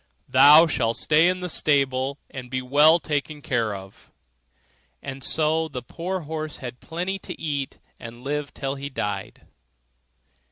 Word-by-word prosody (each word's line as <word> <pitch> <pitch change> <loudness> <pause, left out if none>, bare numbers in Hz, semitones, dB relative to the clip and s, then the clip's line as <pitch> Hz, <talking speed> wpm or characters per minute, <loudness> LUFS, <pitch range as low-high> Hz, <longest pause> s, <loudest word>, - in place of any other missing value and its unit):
'Thou 150 +3 +8
shalt 115 -7 0
stay 160 +2 +4
in 185 0 0
thy 180 - -3
stable 140 -4 +1
and 125 -2 -8
be 130 +1 -2
well 145 +6 +5
taken 150 -2 -3
care 115 -7 -1
of.' 95 0 -12 0.9
And 135 -1 -7
so 160 +1 +1
the 125 -5 -7
poor 175 +8 -4
old - - -12
horse 155 0 -5
had 125 -2 -8
plenty 180 +4 -4
to - - -7
eat, 145 -4 -3 0.2
and 120 +1 -10
lived 145 +1 -3
till 135 -1 -3
he 140 0 -6
died. 105 -7 -5
145 Hz, 155 wpm, -24 LUFS, 130-160 Hz, 0.9 s, Thou